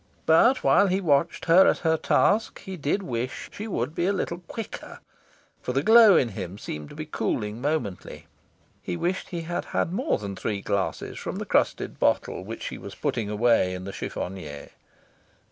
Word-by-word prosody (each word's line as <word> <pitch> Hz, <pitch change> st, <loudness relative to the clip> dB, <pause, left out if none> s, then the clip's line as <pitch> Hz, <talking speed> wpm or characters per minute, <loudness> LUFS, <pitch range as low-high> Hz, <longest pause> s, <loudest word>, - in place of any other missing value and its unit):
But, 235 Hz, +12 st, +5 dB
while 200 Hz, -, +5 dB
he 190 Hz, +1 st, +1 dB
watched 165 Hz, -2 st, +1 dB
her 180 Hz, +3 st, +7 dB
at -, -, +3 dB
her 160 Hz, 0 st, +4 dB
task, 210 Hz, +6 st, +2 dB
he 190 Hz, -, -7 dB
did 160 Hz, +5 st, -1 dB
wish 125 Hz, -4 st, -4 dB
she 215 Hz, -, -6 dB
would 145 Hz, -, -2 dB
be 170 Hz, +2 st, 0 dB
a -, -, +3 dB
little 175 Hz, -3 st, -3 dB
quicker. 225 Hz, -3 st, -7 dB, 0.6 s
For 125 Hz, -, -3 dB
the 135 Hz, +2 st, +1 dB
glow 220 Hz, -3 st, +8 dB
in 120 Hz, -, +2 dB
him 95 Hz, -2 st, -6 dB
seemed 75 Hz, -7 st, -7 dB
to -, -, -12 dB
be -, -, -5 dB
cooling 105 Hz, +2 st, -2 dB
momently. 145 Hz, -10 st, -3 dB, 0.6 s
He 85 Hz, -, -4 dB
wished 185 Hz, -, -2 dB
he 170 Hz, -2 st, -4 dB
had 175 Hz, +1 st, -3 dB
had 170 Hz, -, -1 dB
more 260 Hz, +10 st, 0 dB
than 100 Hz, -1 st, -6 dB
three 100 Hz, +1 st, -3 dB
glasses 100 Hz, -1 st, -2 dB
from -, -, -5 dB
the -, -, -4 dB
crusted -, -, 0 dB
bottle -, -, +1 dB
which 110 Hz, +4 st, -7 dB
she -, -, -5 dB
was -, -, -9 dB
putting 110 Hz, -3 st, -2 dB
away 105 Hz, -4 st, +2 dB
into 95 Hz, +2 st, -6 dB
the -, -, -11 dB
chiffonier. 80 Hz, -6 st, -6 dB
140 Hz, 185 wpm, -26 LUFS, -, 0.6 s, glow